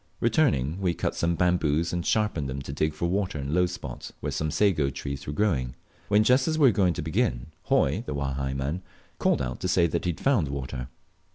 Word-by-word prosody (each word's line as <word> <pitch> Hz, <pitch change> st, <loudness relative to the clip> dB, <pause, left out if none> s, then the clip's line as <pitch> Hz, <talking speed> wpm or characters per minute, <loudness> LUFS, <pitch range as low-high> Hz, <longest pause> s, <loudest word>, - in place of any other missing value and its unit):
Returning, 100 Hz, -, +2 dB
we 90 Hz, -3 st, +1 dB
cut -, -, -1 dB
some 85 Hz, 0 st, 0 dB
bamboos, 85 Hz, -2 st, +1 dB
and 85 Hz, 0 st, -1 dB
sharpened 95 Hz, -11 st, 0 dB
them 65 Hz, +1 st, -4 dB
to 70 Hz, -, -6 dB
dig 75 Hz, +2 st, 0 dB
for 85 Hz, -, -2 dB
water 95 Hz, -2 st, -1 dB
in 70 Hz, -1 st, -4 dB
a -, -, -2 dB
low 90 Hz, +1 st, +3 dB
spot 90 Hz, -, -7 dB
where 75 Hz, -, -3 dB
some 75 Hz, +2 st, -1 dB
sago 80 Hz, -6 st, +2 dB
trees 70 Hz, 0 st, -6 dB
were -, -, -2 dB
growing; 70 Hz, -9 st, 0 dB, 0.3 s
when, 105 Hz, +1 st, +4 dB
just 125 Hz, +3 st, +4 dB
as 155 Hz, -1 st, +1 dB
we 145 Hz, -4 st, +6 dB
were -, -, +1 dB
going 90 Hz, -3 st, +2 dB
to -, -, -3 dB
begin, -, -, -1 dB
Hoi, -, -, +2 dB
the 75 Hz, -, -3 dB
Wahai 70 Hz, -1 st, -2 dB
man, 70 Hz, +7 st, -2 dB, 0.4 s
called -, -, +2 dB
out 60 Hz, 0 st, -4 dB
to 90 Hz, -, -2 dB
say 90 Hz, -1 st, +3 dB
he -, -, -8 dB
had 90 Hz, -3 st, -2 dB
found 120 Hz, -, +2 dB
water. 65 Hz, -2 st, -5 dB
80 Hz, 220 wpm, -27 LUFS, 70-95 Hz, 0.4 s, we